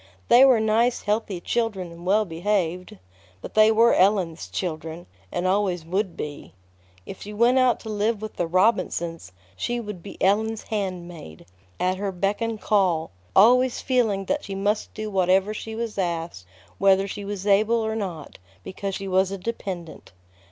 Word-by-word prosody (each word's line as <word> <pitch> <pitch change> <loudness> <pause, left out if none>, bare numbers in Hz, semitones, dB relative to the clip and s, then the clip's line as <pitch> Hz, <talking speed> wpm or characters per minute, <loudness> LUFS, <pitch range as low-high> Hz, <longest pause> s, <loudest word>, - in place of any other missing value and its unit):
They 245 +2 +8
were 260 -4 +6
nice, 225 +3 +1
healthy 210 -3 -1
children 195 -3 -2
and 170 +1 -10
well 210 +3 +3
behaved; 180 - -2 0.4
but - - -9
they 215 0 +6
were 230 +2 +5
Ellen's 185 -4 +2
children, 165 -1 -5 0.3
and 175 - -2
always 185 -3 0
would 185 +1 -2
be. 145 -8 -7 0.5
If - - -9
she 210 - -8
went 240 +4 +4
out 255 -2 +3
to 220 - -8
live 215 +1 0
with 215 0 -7
the 175 - 0
Robinsons, 170 - 0 0.2
she 240 - -2
would 210 -6 -7
be - - -11
Ellen's 220 +3 +1
handmaid, 175 - -5 0.3
at 185 +1 0
her 200 0 -2
beck 195 +4 -1
and 230 -1 -2
call, 185 - +1 0.2
always 250 +5 +5
feeling 225 -7 +1
that 290 +8 -1
she 195 - -6
must 205 +2 -1
do 215 -1 -5
whatever 190 +2 +2
she 220 +1 -6
was 225 -3 -4
asked, 165 - -3 0.3
whether 195 0 +4
she 205 +1 -6
was 200 -1 -5
able 210 +3 +3
or 220 0 -2
not, 175 - -6 0.2
because 195 - -5
she 195 - -5
was 190 0 +2
a 195 - -4
dependent. 185 - -6
195 Hz, 165 wpm, -24 LUFS, 180-220 Hz, 0.5 s, They